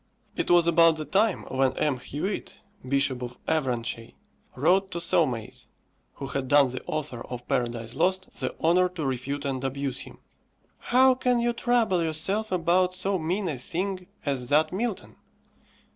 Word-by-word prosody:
It - - -2
was 175 -1 +5
about 165 -1 +5
the 155 -1 -5
time 195 +7 +1
when 130 0 0
M. 150 -4 +1
Huet, 155 +11 -4 0.3
Bishop 135 -1 +1
of 125 0 -6
Avranches, 120 -6 -2 0.4
wrote 185 +8 +3
to 180 - -5
Saumaise, 140 -9 0 0.5
who 140 - -7
had 135 -1 -3
done 145 -1 +5
the 130 - -6
author 140 -6 -3
of 125 -1 -7
"Paradise 120 -4 -2
Lost" 185 0 0
the - - -3
honour 180 +3 +4
to 175 -4 -5
refute 135 +2 -3
and 135 -2 -2
abuse 135 0 -2
him, - - -9 0.7
"_How 255 +1 +5
can 250 -1 +2
you 240 0 +1
trouble 235 -6 +1
yourself 175 +7 0
about 180 +1 +2
so 190 +1 0
mean 180 +5 -1
a 145 -6 -3
thing 185 +6 -3 0.2
as 130 -4 -2
that 155 +3 +3
Milton? 220 +1 -3
155 Hz, 160 wpm, -26 LUFS, 130-185 Hz, 0.7 s, was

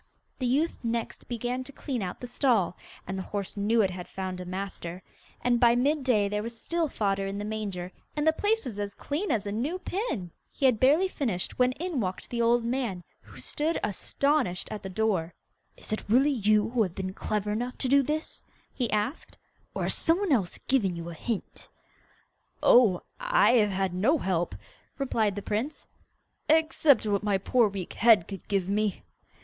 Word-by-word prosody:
The 255 - 0
youth 290 +7 +1
next 230 0 -3
began 245 +2 -2
to 280 - -10
clean 265 -4 -4
out 180 -2 -4
the - - -6
stall, 240 - +1 0.3
and 190 - -4
the 190 - -3
horse 200 0 -4
knew 215 +2 +3
it 190 - +1
had 180 -1 -7
found 185 -1 -5
a - - -6
master; 185 -1 -5 0.4
and 240 -1 +3
by 235 0 +5
mid 280 +4 +2
day 215 -6 +3
there 210 +1 -1
was 230 +1 -6
still 335 +3 -1
fodder 195 -4 0
in 195 +1 -4
the 205 - -4
manger, 200 -4 -4 0.2
and 295 0 0
the 315 - +5
place 430 +6 +1
was 220 -5 -5
as 200 0 -4
clean 320 +8 -3
as 210 -2 0
a 200 - -3
new 265 - -1
pin. 365 - -3 0.2
He 275 - -2
had 250 -5 +4
barely 300 +9 +5
finished 235 - -3
when 250 0 +4
in 340 -1 -3
walked 185 -4 -3
the 235 -1 0
old 235 0 +3
man, 235 -7 -2 0.2
who - - -14
stood 310 +3 -1
astonished 250 - 0
at 210 - -5
the 190 - -6
door. 185 -5 0 0.4
'Is - - -6
it 215 - -4
really 265 +6 +5
you 215 -3 +2
who 245 -2 +2
have 185 -5 0
been 190 -1 -4
clever 210 +1 -2
enough 245 +4 -3
to 260 - -1
do 280 +2 +5
that?' 300 +3 -3 0.3
he 245 -4 -1
asked. 215 +8 -2 0.4
'Or - - -1
has - - +1
some 330 +1 +2
one 400 -3 -1
else 205 -10 +1
given 205 -10 +2
you 170 0 -6
a - - -7
hint?' 215 +5 -5 0.9
'Oh, 215 -8 +6 0.2
I - - +4
have 210 -2 +4
had 190 -1 -1
no 225 - +3
help,' 175 - -1 0.4
replied 225 -7 0
the 205 - -5
prince, 230 +9 -3 0.6
'except 315 -4 +4
what 205 -2 +1
my 205 -2 +1
poor 225 +3 +3
weak 195 -3 -6
head 225 -7 +5
could 195 -3 -8
give 195 -3 0
me. 205 0 0
220 Hz, 195 wpm, -28 LUFS, 195-265 Hz, 0.9 s, Oh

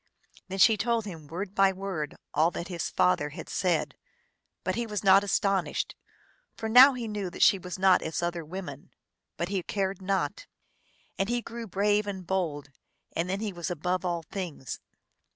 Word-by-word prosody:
Then 190 +1 -5
she 220 +2 +6
told 230 +1 0
him 165 -7 -8
word 185 +5 -5
by 195 -1 +4
word 190 -5 -4 0.2
all 155 +3 +4
that 175 +1 -6
his 175 -2 -3
father 150 -5 +2
had 145 - -8
said; 180 -4 0 0.7
but - - 0
he 235 0 -2
was 210 -2 -3
not 195 0 +7
astonished, 195 -2 0 0.6
for 220 - -3
now 255 +5 +9
he 240 -3 -4
knew 205 -3 -3
that - - 0
she 195 - +6
was 180 0 -6
not 190 -1 +5
as 160 +2 -3
other 170 -1 -2
women; 155 -4 -7 0.5
but 170 - -2
he 195 -2 -1
cared 195 +1 -2
not. 195 - -1 0.7
And 195 +2 +1
he 240 0 0
grew 230 0 -7
brave 205 +2 +1
and 190 -3 -5
bold, 160 -7 -2 0.4
and 170 +2 -1
then 195 +2 -1
he 210 -3 -3
was 170 -1 -4
above 180 +2 -1
all 170 -2 -1
things. 170 - -6
190 Hz, 180 wpm, -28 LUFS, 170-205 Hz, 0.7 s, now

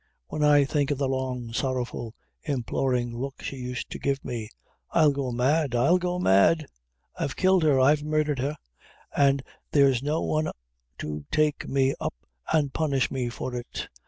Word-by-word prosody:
when 150 - -2
I 145 -1 +6
think 145 0 0
of 145 - 0
the 140 0 0
long, 130 -3 -3
sorrowful, 120 -3 -2 0.3
implorin' 125 -2 0
look 135 +3 -5
she 135 - -5
used 125 -1 -5
to - - -5
give 140 0 -1
me. 115 -4 -4 0.4
I'll 150 -2 +4
go 135 -2 -2
mad! 135 +3 +1
I'll 140 +10 +4
go 180 0 -1
mad! 155 - +4 0.5
I've 135 - -2
killed 185 -1 +4
her 150 -4 +4
I've 145 +3 +4
murdhered 150 -2 0
her, 145 +4 -2 0.6
an' 140 -1 +4 0.3
there's 135 -4 +4
no 150 +3 -1
one 155 0 0 0.5
to 75 -1 -5
take 155 -1 +1
me 135 0 +2
up - - -3 0.4
an' 150 -4 +2
punish 140 -4 0
me 125 -3 -1
for 125 +1 -5
it! 120 -1 -5
135 Hz, 165 wpm, -26 LUFS, 125-150 Hz, 0.6 s, I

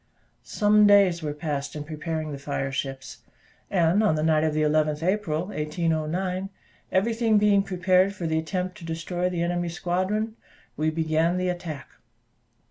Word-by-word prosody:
Some 210 0 +3
days 195 -4 +5
were 150 -1 -3
passed 145 -2 -4
in 150 - -4
preparing 155 0 -4
the 140 - -6
fire 135 -1 -3
ships; 135 -1 -5 0.5
and 175 +1 +3
on 210 -7 +3
the 155 - -1
night 155 -1 +3
of 155 -1 0
the 155 - +2
11th 150 0 +1
April, 180 -2 -1
1809, 170 +3 -2 0.4
everything 225 +3 +2
being 205 -1 +4
prepared 185 +1 +2
for 180 - -5
the 160 0 +1
attempt 180 +4 -3
to - - -12
destroy 170 +2 -2
the 175 -2 -2
enemy's 175 0 -2
squadron, 205 +6 -1 0.4
we 155 +1 0
began 160 +2 +1
the 180 0 0
attack. 175 -5 -5
170 Hz, 155 wpm, -25 LUFS, 155-185 Hz, 0.5 s, days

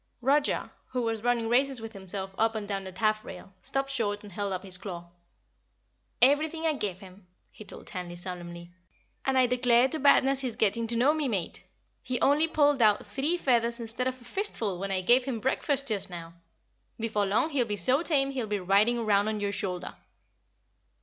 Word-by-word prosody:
Roger, 285 +3 +1 0.2
who 250 -1 -2
was 225 -1 -2
running 235 -1 +1
races 260 +2 +2
with 225 0 -8
himself 190 0 -5
up 225 +2 +1
and 210 -2 -4
down 195 -1 -3
the 190 - -7
taffrail, 215 -1 -2
stopped 275 0 -1
short 205 -6 -1
and 205 - -11
held 200 +2 -3
up 185 -1 -3
his 185 -2 -1
claw. 175 -4 -7 1.2
"Everything 310 +4 +3
I 315 - +2
give 200 -9 -4
him," 190 0 -14 0.2
he - - -12
told - - -11
Tandy 180 -2 -6
solemnly. 175 -1 -7 0.5
"And 270 -1 +1
I 255 - +5
declare 245 0 +4
to 315 - -1
badness 275 -1 +4
he's 255 -4 -2
getting 225 +2 +1
to 235 - +2
know 270 +6 +4
me, 310 -3 -1
Mate. 195 -8 -3 0.4
He 250 -2 -2
only 290 +5 +3
pulled 290 -4 +2
out 210 -2 +4
three 270 +12 -1
feathers 235 -5 +1
instead 235 +2 -2
of 255 0 -3
a - - -16
fistful 235 - -2
when 195 +1 -3
I 190 -1 0
gave 245 +6 +4
him 255 -4 -3
breakfast 275 +3 0
just 205 -3 -1
now. 170 -2 -8 0.7
Before 215 -3 0
long 220 +11 +1
he'll 255 -5 +1
be 205 - -2
so 255 - +2
tame 275 -5 +1
he'll 255 -5 -3
be 205 -1 -1
riding 200 +6 +3
around 210 -3 +2
on 215 -1 -1
your 200 0 -1
shoulder." 185 -2 -4
225 Hz, 195 wpm, -28 LUFS, 195-265 Hz, 1.2 s, I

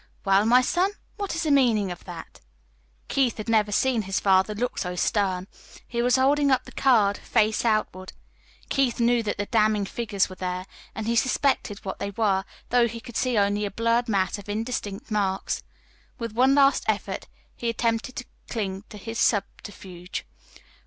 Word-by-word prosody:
"Well, 195 +2 +4
my 250 +2 +6
son, 365 +9 +1 0.2
what 400 -5 -3
is 335 - -1
the 310 - +1
meaning 230 -8 +3
of 175 - -9
that?" 175 -3 -10 0.7
Keith 265 -4 +1
had 215 - -6
never 215 -2 +2
seen 245 +2 +2
his 195 -1 -2
father 190 +1 +3
look 245 +4 -2
so 180 -2 -3
stern. 185 -1 0 0.4
He 235 -1 -2
was 245 0 +3
holding 280 +2 +3
up 260 -2 +3
the - - -13
card, 215 -7 +3
face 215 0 +1
outward. 215 -5 -1 0.6
Keith 265 -3 +1
knew 240 0 +3
that 210 -2 -3
the 205 - -2
damning 215 -2 +2
figures 205 -1 -1
were 185 - -10
there, 185 0 -3 0.3
and 220 - -4
he 230 +1 0
suspected 255 -4 0
what 190 - -5
they 200 - -3
were, 200 -2 +1 0.2
though 240 -1 +4
he 230 0 -7
could 240 -1 -12
see 250 -2 +1
only 205 +1 +2
a 205 - -1
blurred 230 +3 +1
mass 195 -1 0
of 205 - -12
indistinct 215 -1 -4
marks. 195 -2 -1 0.6
With 230 -2 -4
one 260 +4 +4
last 275 -1 +4
effort - - -2 0.3
he 235 - -2
attempted 230 +2 -1
still 250 - -4 0.2
to - - -8
cling 195 -3 -3
to 210 - -10
his 225 +3 -6
subterfuge. 190 -3 -2
220 Hz, 180 wpm, -25 LUFS, 200-245 Hz, 0.7 s, my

